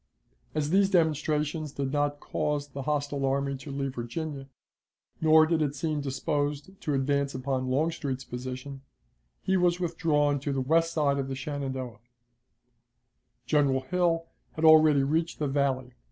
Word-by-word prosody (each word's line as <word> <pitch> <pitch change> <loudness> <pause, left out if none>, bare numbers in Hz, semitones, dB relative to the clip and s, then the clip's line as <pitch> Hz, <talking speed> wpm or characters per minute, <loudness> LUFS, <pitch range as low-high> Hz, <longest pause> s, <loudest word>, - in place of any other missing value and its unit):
As 150 0 0
these 195 +1 +4
demonstrations 155 -3 +1
did 135 -1 -2
not 145 0 0
cause 145 -1 -2
the 135 0 -6
hostile 145 0 -1
army 140 +1 0
to 140 +3 -10
leave 135 -1 -3
Virginia, 135 +3 -5 0.7
nor 160 0 +6
did 160 0 +1
it 145 -2 0
seem 150 0 -2
disposed 145 +3 -2
to 150 - -1
advance 140 0 0
upon 130 0 -2
Longstreet's 140 -1 -1
position, 130 +2 -7 0.6
he 190 0 +2
was 175 -1 +2
withdrawn 150 -4 +1
to 140 +1 -3
the 135 - -1
west 165 +5 +2
side 140 -3 +1
of 135 - -2
the 135 - -4
Shenandoah. 130 -3 -4 1.5
General 140 -1 +2
Hill 165 +4 0 0.3
had 160 - -1
already 155 -3 +7
reached 160 +4 0
the 150 - -1
Valley. 135 -2 0
145 Hz, 145 wpm, -28 LUFS, 135-155 Hz, 1.5 s, already